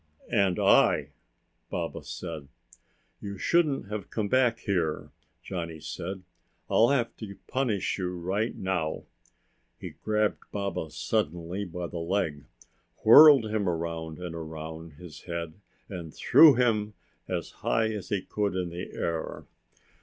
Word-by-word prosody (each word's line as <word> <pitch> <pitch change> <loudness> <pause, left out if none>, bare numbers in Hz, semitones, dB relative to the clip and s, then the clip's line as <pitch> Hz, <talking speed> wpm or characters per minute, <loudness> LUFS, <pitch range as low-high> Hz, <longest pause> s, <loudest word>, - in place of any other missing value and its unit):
"And 100 -4 +2
I!" - - +4 0.6
Baba - - -4
said. 80 -5 -7 0.7
"You 100 -1 -6
shouldn't 155 - +1
have 105 -2 -5
come 105 -2 -2
back 125 -2 +3
here!" 90 -8 -2 0.3
Johnny 85 -4 -5
said. 85 +4 -6 0.5
"I'll 115 - +5
have 125 -5 +1
to 100 -3 -8
punish 115 -8 -1
you 90 -1 -3
right 95 +6 -1
now!" 95 -5 -2 0.8
He - - -7
grabbed 105 0 0
Baba 100 -5 -3
suddenly 85 +7 -2
by 90 0 -5
the 85 0 -5
leg, 85 -5 -1 0.6
whirled 140 +2 +9
him 105 -3 -1
around 80 -2 -3
and 90 -2 -6
around 80 0 -7
above - - -21
his 85 -4 -11
head 85 -2 -4 0.3
and 85 -5 -7
threw 155 - +7
him 110 -4 +1 0.3
as - - -3
high 110 -1 +1
as 105 -4 -6
he 100 -3 -1
could 100 -3 -2
in 90 -2 -1
the 85 +2 -7
air. 85 -1 -3
95 Hz, 135 wpm, -28 LUFS, 85-105 Hz, 0.8 s, whirled